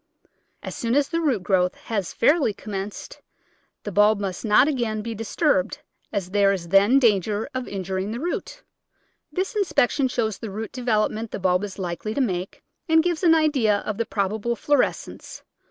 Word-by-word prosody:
As - - -5
soon 235 +1 -1
as 285 -1 +2
the 335 0 -1
root 260 - 0
growth 180 -2 +1
has 200 -6 -4
fairly 285 -5 +2
commenced 205 - -7 0.6
the 205 - -5
bulb 210 +1 +4
must 190 -3 -4
not 220 +5 +5
again 235 -7 -1
be 230 0 -4
dis 225 0 -7
turbed, 290 - +2 0.3
as 195 -4 -3
there 200 -1 +4
is 175 -4 -3
then 200 +8 +5
danger 210 -3 +2
of 255 -1 -4
injuring 190 0 -3
the 235 - -4
root. 355 - -4 0.7
This 380 +5 -2
inspection 295 -9 +2
shows 220 -5 -2
the 225 - -6
root 215 +3 -5
development 225 -2 -1
the - - -5
bulb 185 0 +1
is 200 -2 -6
likely 185 +3 -4
to - - -1
make, 185 -6 -3 0.3
and 320 0 +5
gives 345 -2 -1
an 335 -3 +5
idea 275 -10 +2
of 215 0 -4
the 230 - +1
probable 215 +4 -1
florescence. 290 +2 -1
215 Hz, 175 wpm, -24 LUFS, 195-260 Hz, 0.7 s, not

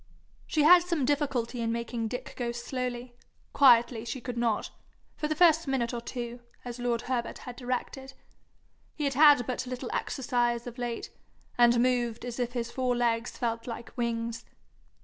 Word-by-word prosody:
She 305 - +1
had 350 +3 +8
some 340 -6 -1
difficulty 260 -4 -1
in 230 0 0
making 235 0 -3
Dick 250 +2 -6
go 240 -1 -2
slowly 245 0 -4 0.4
quietly 240 -4 +5
she 240 +3 -5
could 245 0 -6
not 235 -3 0 0.4
for 300 - -2
the 310 - -1
first 325 -1 +5
minute 255 -3 0
or 235 - -3
two, 240 0 -6 0.3
as 245 0 -6
lord 240 -1 -1
Herbert 245 -2 -2
had 250 - -9
directed. 260 +1 -4 0.8
He 300 - -4
had 280 -1 +1
had 290 -3 +6
but 255 +1 -3
little 255 0 -5
exercise 240 -2 -1
of 245 0 -8
late, 240 -1 -4 0.4
and 240 0 +5
moved 245 -2 0
as 245 0 -5
if 245 0 -1
his 235 -1 -3
four 255 -2 0
legs 235 0 0
felt 230 -1 -2
like 235 0 -7
wings. 230 -1 -2
245 Hz, 170 wpm, -29 LUFS, 235-260 Hz, 0.8 s, had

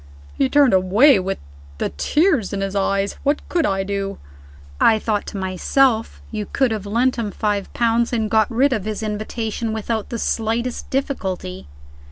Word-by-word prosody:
He 270 - +1
turned 280 -6 +4
away 195 +7 +5
with 190 +1 -2 0.4
the - - -1
tears 265 - +1
in 195 - -2
his 195 0 -3
eyes. 195 0 0
What 290 +1 0
could 340 -3 +1
I 195 -1 0
do?" 195 0 -3 0.6
I 220 - +5
thought 215 -1 -2
to 205 - -6
myself, 220 +6 +1
"You 210 -2 -4
could 265 -4 +1
have 210 -2 -3
lent 245 +5 +1
him 225 -3 -2
five 205 -1 -2
pounds, 235 0 +1
and 225 -3 0
got 220 0 +2
rid 260 +4 +2
of 215 -5 -2
his 215 0 -3
invitation 220 +1 -3
without 220 0 -3
the 235 - -3
slightest 230 +2 -2
difficulty." 190 - -3
220 Hz, 170 wpm, -21 LUFS, 200-240 Hz, 0.6 s, away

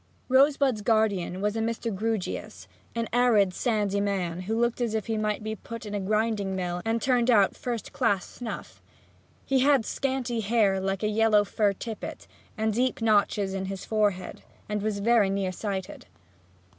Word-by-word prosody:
Rosebud's 270 -3 +4
guardian 205 -5 +1
was 210 +1 0
a - - -1
Mr. 230 -1 -2
Grewgious, 220 -1 -3 0.3
an 230 -1 -1
arid, 225 -6 +4
sandy 205 -4 0
man 185 -4 -1
who 225 +1 0
looked 235 +1 0
as 230 -2 0
if 220 - -1
he 225 - -2
might 215 0 -1
be 220 0 -3
put 230 +2 -8
in 210 - -6
a 205 - -1
grinding 210 -1 0
mill 180 -1 -2
and 225 +1 0
turned 245 0 +2
out 205 -5 +4
first 240 -3 -5
class 205 -7 +1
snuff. 240 -2 -8 0.6
He 270 -1 +2
had 270 -3 +4
scanty 260 -3 -2
hair 210 -3 +2
like 195 +1 -2
a - - +2
yellow 215 -1 +4
fur 205 0 +1
tippet, 220 +2 -7 0.3
and 220 0 0
deep 250 +3 0
notches 205 -3 +2
in 190 0 -3
his 195 -1 -5
forehead, 205 -4 -1 0.3
and 210 -1 -2
was 210 0 -1
very 215 -1 +3
near 195 -1 -1
sighted. 190 0 -5
215 Hz, 170 wpm, -27 LUFS, 200-230 Hz, 0.6 s, Rosebud's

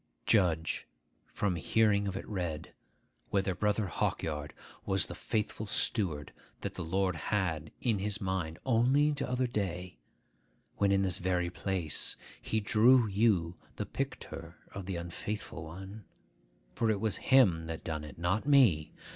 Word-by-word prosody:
Judge, 85 -7 +2 0.4
from 95 -4 -1
hearing 100 +3 +2
of 95 -1 -3
it - - -7
read, 85 -7 -4 0.6
whether 95 -1 +1
Brother 105 +3 +1
Hawkyard 75 -3 -2 0.3
was 95 0 +1
the - - -7
faithful 110 -1 -2
steward 90 -8 0 0.3
that - - -4
the - - -5
Lord 95 +2 0
had 80 -4 -1
in 115 -5 +1
his 105 +1 0
mind 95 -4 -2
only 135 +5 +4
t'other 130 -2 -1
day, 90 - -3 0.8
when, 100 -1 +3
in 100 0 +3
this 95 -1 +1
very 90 -1 0
place, 90 -6 -1 0.3
he 110 - 0
drew 115 +4 +5
you 95 -5 +2 0.2
the - - -3
picter - - -5 0.2
of 95 -1 -7
the 95 - -2
unfaithful 85 +1 -5
one; 95 +5 -9 0.7
for 115 - +1
it 105 -2 +1
was 110 -1 0
him 95 -12 +4
that 80 -1 -5
done 80 -2 -3
it, 75 -2 -10
not 95 - 0
me. 115 - +5
95 Hz, 145 wpm, -31 LUFS, 85-110 Hz, 0.8 s, drew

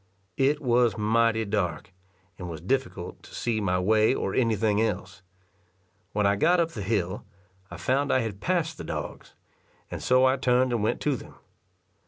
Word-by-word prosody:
It 140 +2 +2
was 120 -2 +3
mighty 110 +1 +2
dark, 95 -5 -2 0.5
and 90 -1 -6
was 80 -2 -6
difficult 100 - -3
to - - -13
see 115 -3 -1
my 90 -2 +1
way 110 +6 +3
or - - -2
any 115 -3 +2
thing 105 0 +1
else. 100 -3 -3 0.9
When 105 0 0
I 100 0 +3
got 175 - +3
up 165 -1 +1
the 105 - -6
hill, 95 -2 -1 0.5
I - - -8
found 140 +2 0
I 130 - +3
had 105 -4 -5
passed 170 -2 -1
the - - -5
dogs; - - -6 0.6
and - - -5
so 130 +1 +4
I 130 +1 +3
turned 125 -1 +2
and 115 - 0
went 105 - 0
to 145 -2 +1
them. - - -11
115 Hz, 180 wpm, -26 LUFS, 100-130 Hz, 0.9 s, so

